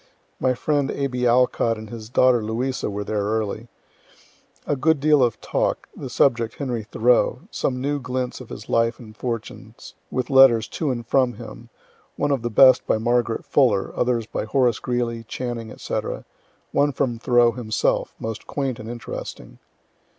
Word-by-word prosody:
My 130 Hz, -1 st, +1 dB
friend 145 Hz, +1 st, 0 dB
A. 140 Hz, -, -2 dB
B. 125 Hz, -2 st, 0 dB
Alcott 120 Hz, -2 st, +2 dB
and 110 Hz, -1 st, -9 dB
his 110 Hz, -2 st, -8 dB
daughter 125 Hz, -2 st, +4 dB
Louisa 120 Hz, +4 st, -2 dB
were 105 Hz, 0 st, -4 dB
there 105 Hz, 0 st, -2 dB
early. 110 Hz, +2 st, -2 dB, 1.0 s
A 145 Hz, -, 0 dB
good 155 Hz, +3 st, +2 dB
deal 150 Hz, 0 st, +4 dB
of 120 Hz, -3 st, +1 dB
talk, -, -, -1 dB
the -, -, -7 dB
subject 115 Hz, -4 st, +2 dB
Henry 125 Hz, -5 st, -3 dB
Thoreau 120 Hz, +4 st, +2 dB
some 125 Hz, -1 st, -1 dB
new 145 Hz, +2 st, -1 dB
glints 125 Hz, 0 st, -3 dB
of 125 Hz, -, -11 dB
his 105 Hz, -, -9 dB
life 115 Hz, 0 st, +1 dB
and 110 Hz, -3 st, -13 dB
fortunes, 115 Hz, -1 st, -6 dB, 0.2 s
with 130 Hz, 0 st, -3 dB
letters 130 Hz, -5 st, +6 dB
to 155 Hz, +4 st, -2 dB
and 120 Hz, -3 st, -3 dB
from 125 Hz, 0 st, +2 dB
him -, -, -11 dB, 0.5 s
one 145 Hz, -, 0 dB
of 135 Hz, -3 st, +1 dB
the 120 Hz, -, -2 dB
best 130 Hz, +4 st, +6 dB
by -, -, +2 dB
Margaret 120 Hz, 0 st, 0 dB
Fuller, 115 Hz, -9 st, +2 dB
others 120 Hz, -2 st, 0 dB
by 115 Hz, -, -4 dB
Horace 120 Hz, 0 st, +2 dB
Greeley, 120 Hz, -2 st, -2 dB
Channing, 115 Hz, -2 st, -5 dB
&c. -, -, -2 dB, 0.7 s
one 145 Hz, 0 st, +2 dB
from 125 Hz, -4 st, -1 dB
Thoreau 120 Hz, -1 st, +4 dB
himself, 110 Hz, -3 st, -1 dB
most 110 Hz, -1 st, -6 dB
quaint 135 Hz, -4 st, -3 dB
and 110 Hz, +1 st, -8 dB
interesting. 85 Hz, -, -8 dB
120 Hz, 165 wpm, -23 LUFS, 115-130 Hz, 1.0 s, letters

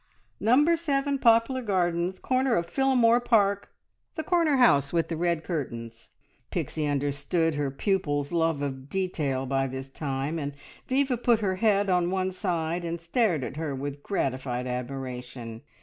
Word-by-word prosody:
"Number 295 Hz, +9 st, +4 dB
Seven, 280 Hz, -3 st, 0 dB
Poplar 230 Hz, +2 st, +4 dB
Gardens, 180 Hz, -4 st, 0 dB
corner 255 Hz, +1 st, +1 dB
of 170 Hz, -, 0 dB
Phillamore 245 Hz, +1 st, +3 dB
Park 200 Hz, -4 st, +2 dB, 0.5 s
the 315 Hz, -, -3 dB
corner 330 Hz, -4 st, +2 dB
house 140 Hz, -, +4 dB
with 165 Hz, -1 st, 0 dB
the 165 Hz, -, -2 dB
red 170 Hz, 0 st, 0 dB
curtains!" 115 Hz, -9 st, -5 dB, 0.4 s
Pixie 155 Hz, -1 st, -2 dB
understood 145 Hz, +3 st, 0 dB
her 145 Hz, -1 st, -1 dB
pupil's 145 Hz, -2 st, -1 dB
love 165 Hz, -4 st, +1 dB
of 135 Hz, -1 st, -5 dB
detail 150 Hz, -8 st, -1 dB
by 135 Hz, 0 st, 0 dB
this 130 Hz, +1 st, -7 dB
time, 140 Hz, +3 st, -3 dB
and 145 Hz, -1 st, -4 dB, 0.3 s
Viva 265 Hz, -1 st, +1 dB
put 235 Hz, -1 st, +3 dB
her 190 Hz, -3 st, 0 dB
head 205 Hz, -1 st, +2 dB
on 180 Hz, -2 st, +2 dB
one 190 Hz, 0 st, 0 dB
side 175 Hz, -2 st, -2 dB
and 170 Hz, 0 st, -3 dB
stared 170 Hz, -, +1 dB
at 130 Hz, -, -6 dB
her 155 Hz, -3 st, -3 dB
with 140 Hz, +1 st, -5 dB
gratified 130 Hz, -8 st, -2 dB
admiration. 125 Hz, -2 st, -5 dB
170 Hz, 150 wpm, -27 LUFS, 140-220 Hz, 0.5 s, Number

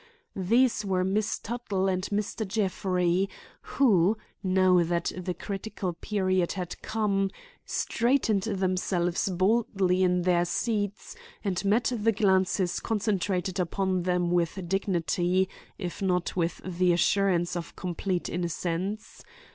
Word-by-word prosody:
These 230 Hz, +6 st, +2 dB
were 185 Hz, -2 st, 0 dB
Miss 205 Hz, +3 st, 0 dB
Tuttle 210 Hz, -4 st, -2 dB
and 185 Hz, 0 st, 0 dB
Mr. 210 Hz, +2 st, -2 dB
Jeffrey, 190 Hz, -2 st, 0 dB, 0.5 s
who, 210 Hz, -6 st, +4 dB, 0.2 s
now 185 Hz, -2 st, +4 dB
that 170 Hz, 0 st, 0 dB
the 180 Hz, -1 st, -4 dB
critical 195 Hz, -2 st, -4 dB
period 185 Hz, -1 st, 0 dB
had 180 Hz, -3 st, -5 dB
come, 205 Hz, -3 st, 0 dB, 0.4 s
straightened 235 Hz, -4 st, +1 dB
themselves 185 Hz, -3 st, 0 dB
boldly 190 Hz, -1 st, +2 dB
in 180 Hz, -1 st, +2 dB
their 175 Hz, -1 st, +3 dB
seats 205 Hz, -, -2 dB, 0.3 s
and 190 Hz, -3 st, -1 dB
met 220 Hz, +4 st, +2 dB
the 225 Hz, 0 st, +2 dB
glances 190 Hz, -3 st, +2 dB
concentrated 195 Hz, -4 st, -1 dB
upon 185 Hz, +1 st, 0 dB
them 180 Hz, -1 st, 0 dB
with 175 Hz, +1 st, 0 dB
dignity, 185 Hz, 0 st, +1 dB, 0.3 s
if 180 Hz, 0 st, -5 dB
not 180 Hz, -2 st, 0 dB
with 170 Hz, -1 st, -1 dB
the 180 Hz, 0 st, +2 dB
assurance 180 Hz, -1 st, +2 dB
of 175 Hz, -1 st, -5 dB
complete 180 Hz, 0 st, -2 dB
innocence. 180 Hz, +4 st, -3 dB
190 Hz, 115 wpm, -28 LUFS, 180-205 Hz, 0.5 s, who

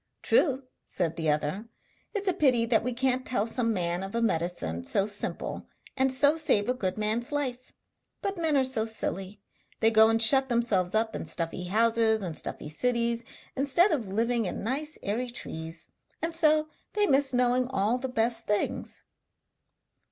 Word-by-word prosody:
'True!' 275 Hz, -4 st, +2 dB, 0.2 s
said 165 Hz, -3 st, -2 dB
the 160 Hz, -2 st, -1 dB
other, 150 Hz, +9 st, -1 dB, 0.5 s
'it's 405 Hz, -1 st, -2 dB
a 375 Hz, -, +3 dB
pity 260 Hz, -9 st, +2 dB
that 225 Hz, -1 st, +2 dB
we 250 Hz, -, -1 dB
can't 255 Hz, +1 st, 0 dB
tell 230 Hz, -5 st, -1 dB
some 230 Hz, 0 st, 0 dB
man 175 Hz, -3 st, -1 dB
of 195 Hz, +3 st, -6 dB
a -, -, +1 dB
medicine 165 Hz, -, -1 dB
so 195 Hz, -, +1 dB
simple, 205 Hz, -1 st, -3 dB, 0.3 s
and 265 Hz, 0 st, +2 dB
so 285 Hz, +3 st, +4 dB
save 210 Hz, -10 st, +2 dB
a 250 Hz, -, +2 dB
good 190 Hz, -7 st, -3 dB
man's 220 Hz, +4 st, -1 dB
life. 255 Hz, -4 st, -3 dB, 0.5 s
But 395 Hz, 0 st, -3 dB
men 315 Hz, -3 st, +2 dB
are 270 Hz, -, +3 dB
so 255 Hz, -4 st, 0 dB
silly; 200 Hz, -3 st, -2 dB, 0.4 s
they 225 Hz, 0 st, +4 dB
go 220 Hz, 0 st, +6 dB
and 225 Hz, 0 st, +2 dB
shut 265 Hz, +4 st, +5 dB
themselves 220 Hz, -6 st, +1 dB
up 220 Hz, 0 st, 0 dB
in -, -, -5 dB
stuffy 170 Hz, +1 st, -2 dB
houses 220 Hz, +2 st, +2 dB
in 175 Hz, -3 st, -4 dB
stuffy 155 Hz, -, -1 dB
cities 235 Hz, +6 st, 0 dB, 0.3 s
instead 285 Hz, +8 st, +3 dB
of 250 Hz, -9 st, -1 dB
living 230 Hz, +3 st, 0 dB
in 180 Hz, -, -4 dB
nice 290 Hz, +7 st, -2 dB
airy 235 Hz, +5 st, -2 dB
trees, 160 Hz, -8 st, -7 dB, 0.3 s
and 330 Hz, +1 st, -2 dB
so 310 Hz, -2 st, +3 dB, 0.3 s
they 420 Hz, -1 st, +2 dB
miss 275 Hz, -4 st, +2 dB
knowing 250 Hz, 0 st, +2 dB
all 235 Hz, 0 st, 0 dB
the 265 Hz, +1 st, -4 dB
best 230 Hz, -1 st, -1 dB
things.' 210 Hz, 0 st, -2 dB
230 Hz, 175 wpm, -28 LUFS, 200-260 Hz, 0.5 s, go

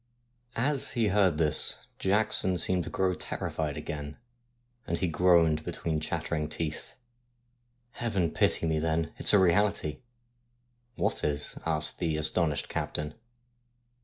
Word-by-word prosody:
As 135 Hz, +3 st, +1 dB
he 115 Hz, -3 st, +2 dB
heard 95 Hz, -5 st, +3 dB
this 75 Hz, -2 st, 0 dB
Jackson 95 Hz, -2 st, +3 dB
seemed 90 Hz, -1 st, +1 dB
to -, -, -5 dB
grow 95 Hz, -1 st, +1 dB
terrified 75 Hz, -4 st, -4 dB
again, 75 Hz, -1 st, -6 dB, 0.7 s
and -, -, -1 dB
he 95 Hz, -, 0 dB
groaned 80 Hz, -2 st, +3 dB
between 80 Hz, -1 st, -2 dB
chattering 75 Hz, 0 st, -2 dB
teeth: 80 Hz, 0 st, -4 dB, 0.5 s
' 120 Hz, 0 st, -44 dB
Heaven 100 Hz, -8 st, 0 dB
pity -, -, +1 dB
me 80 Hz, -1 st, +1 dB
then, 80 Hz, 0 st, -1 dB
it's -, -, +4 dB
a 105 Hz, -, +6 dB
reality! 95 Hz, -4 st, +2 dB, 0.3 s
' 120 Hz, 0 st, -44 dB
' 120 Hz, 0 st, -43 dB
What -, -, -1 dB
is? 75 Hz, 0 st, 0 dB
' -, -, -19 dB
asked 75 Hz, -2 st, -1 dB
the 80 Hz, -3 st, 0 dB
astonished 75 Hz, -1 st, 0 dB
captain. 75 Hz, 0 st, -3 dB
85 Hz, 140 wpm, -29 LUFS, 75-105 Hz, 0.7 s, a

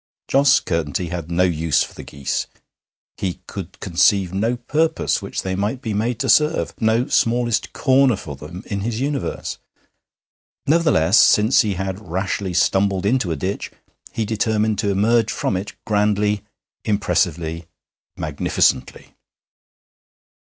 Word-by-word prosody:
Jos 135 Hz, 0 st, +4 dB
Curtenty 85 Hz, +1 st, -2 dB
had 85 Hz, -2 st, -5 dB
no 85 Hz, +1 st, +2 dB
use 80 Hz, -4 st, +2 dB
for -, -, -9 dB
the -, -, -9 dB
geese; 70 Hz, -1 st, -3 dB, 0.7 s
he 95 Hz, -3 st, -3 dB
could -, -, -8 dB
conceive 90 Hz, +1 st, +2 dB
no 115 Hz, +5 st, 0 dB
purpose 155 Hz, +7 st, 0 dB
which -, -, -4 dB
they 95 Hz, -, -2 dB
might 105 Hz, +6 st, -2 dB
be 115 Hz, -5 st, -4 dB
made 110 Hz, +3 st, -1 dB
to 135 Hz, -, -1 dB
serve, 140 Hz, -, +3 dB
no 110 Hz, +2 st, +2 dB
smallest 120 Hz, -1 st, +1 dB
corner 130 Hz, -3 st, +3 dB
for 75 Hz, -7 st, -8 dB
them 85 Hz, +8 st, -9 dB
in 100 Hz, -, -3 dB
his 110 Hz, +2 st, -3 dB
universe. 140 Hz, +1 st, -3 dB, 1.1 s
Nevertheless, 145 Hz, -, +4 dB
since 110 Hz, +5 st, +5 dB
he 105 Hz, -4 st, -1 dB
had 95 Hz, +1 st, -3 dB
rashly 95 Hz, +1 st, -2 dB
stumbled 95 Hz, +1 st, +2 dB
into 105 Hz, -5 st, +1 dB
a -, -, 0 dB
ditch, 95 Hz, +7 st, -3 dB, 0.4 s
he 110 Hz, -, -2 dB
determined 110 Hz, 0 st, 0 dB
to 105 Hz, -, 0 dB
emerge 110 Hz, +3 st, +2 dB
from -, -, -1 dB
it 95 Hz, +3 st, -4 dB
grandly, 105 Hz, -1 st, +1 dB, 0.4 s
impressively, 85 Hz, -5 st, -1 dB, 0.5 s
magnificently. 70 Hz, -3 st, -1 dB
100 Hz, 135 wpm, -21 LUFS, 90-115 Hz, 1.1 s, since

